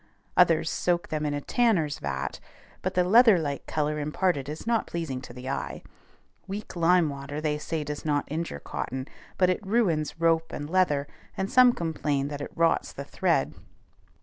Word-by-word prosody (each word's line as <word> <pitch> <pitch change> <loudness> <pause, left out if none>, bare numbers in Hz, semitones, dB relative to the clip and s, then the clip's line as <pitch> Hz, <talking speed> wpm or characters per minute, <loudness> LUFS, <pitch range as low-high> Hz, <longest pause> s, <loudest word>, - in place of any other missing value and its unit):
Others - - +4
soak 175 -1 0
them 155 -1 -1
in 145 - -1
a 145 - -3
tanner's 180 - +1
vat; 70 0 -3 0.4
but - - -2
the 180 - +4
leather 220 +2 +7
like 145 -4 -3
color 150 0 -1
imparted 150 -1 0
is 155 +1 -6
not 230 -1 +1
pleasing 155 -7 -4
to 125 - -10
the 125 +1 -9
eye. - - -4 0.6
Weak 200 +1 -6
lime 170 0 +4
water 140 +1 -5
they 150 -1 -1
say 160 0 -3
does 150 0 -5
not 145 -2 0
injure 160 - -3
cotton; 130 - -5 0.3
but 185 -1 +4
it 185 - -3
ruins 185 -8 0
rope 165 -1 +2
and 145 - -5
leather, 150 -5 +2 0.3
and 190 0 -2
some 250 -1 +7
complain 150 -7 -1
that 145 -1 -5
it - - -5
rots 165 0 +2
the 140 - -7
thread. 165 -3 +1
155 Hz, 175 wpm, -27 LUFS, 145-180 Hz, 0.6 s, leather